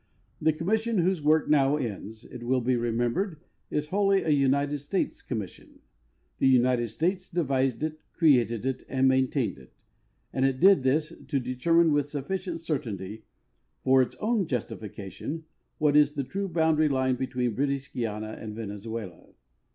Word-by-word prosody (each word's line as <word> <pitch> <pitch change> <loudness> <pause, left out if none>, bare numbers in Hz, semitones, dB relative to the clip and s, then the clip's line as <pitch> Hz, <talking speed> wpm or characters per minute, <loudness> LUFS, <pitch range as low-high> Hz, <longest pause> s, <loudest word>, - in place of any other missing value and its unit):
The 160 +1 +4
commission, 215 +8 0
whose 180 -1 +2
work 155 +1 +3
now 145 -1 +4
ends, 110 -3 -5
it 120 - -10
will 130 +2 +1
be 125 +1 +1
remembered, 120 - -1 0.3
is 150 0 -2
wholly 195 0 +2
a - - -2
United 140 +1 +2
States 145 +7 -2
commission. 110 -7 -7 0.6
The - - +4
United 125 -2 +3
States 180 - -2
de 175 0 0
vised 135 -2 0
it, 155 0 -3
created 120 - +3
it, 130 -1 -2
and 135 0 +2
maintained 130 - +1
it; 65 - -18 0.6
and 130 - 0
it 135 -1 +1
did 195 -1 +6
this 150 +5 +1
"to 140 - 0
deter 130 +6 0
mine 170 -1 +5
with 145 -1 +1
sufficient 170 +4 -4
certainty, 110 - -4 0.6
for 130 0 +5
its 125 - -2
own 215 -4 0
justification, 115 +5 -5 0.3
what 150 -1 +2
is 150 0 +5
the 140 - -1
true 195 +9 -3
boundary' 160 -2 +3
line 130 -1 +1
between 125 -2 -2
British 140 +2 -2
Guiana 110 -2 -3
and 105 -1 -6
Venezuela." 105 -3 -7
135 Hz, 160 wpm, -27 LUFS, 120-160 Hz, 0.6 s, did